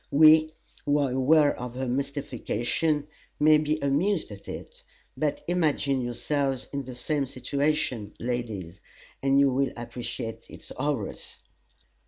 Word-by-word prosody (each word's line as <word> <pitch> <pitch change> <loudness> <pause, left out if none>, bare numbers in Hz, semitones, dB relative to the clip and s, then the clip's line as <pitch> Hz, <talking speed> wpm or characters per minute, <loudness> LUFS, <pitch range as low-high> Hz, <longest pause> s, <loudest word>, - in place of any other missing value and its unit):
We, 155 +1 +7 0.3
who 145 0 +2
are 140 -3 +1
aware 145 +3 +4
of 125 -1 -6
her 130 0 -2
mystification, 140 +2 -1 0.3
may 155 0 +6
be 155 0 0
amused 155 - +1
at 100 -1 -11
it; - - -8 0.3
but 150 -2 -1
imagine 150 -6 +1
yourselves 135 +2 -1
in 140 0 -2
the 130 -1 -7
same 140 +2 -1
situation, 130 -4 -1
ladies, 110 -8 -4 0.4
and 135 0 +4
you 140 -1 +5
will 135 +2 +1
appreciate 120 -1 -6
its - - -11
horrors! 135 -6 -3
140 Hz, 130 wpm, -27 LUFS, 125-150 Hz, 0.4 s, We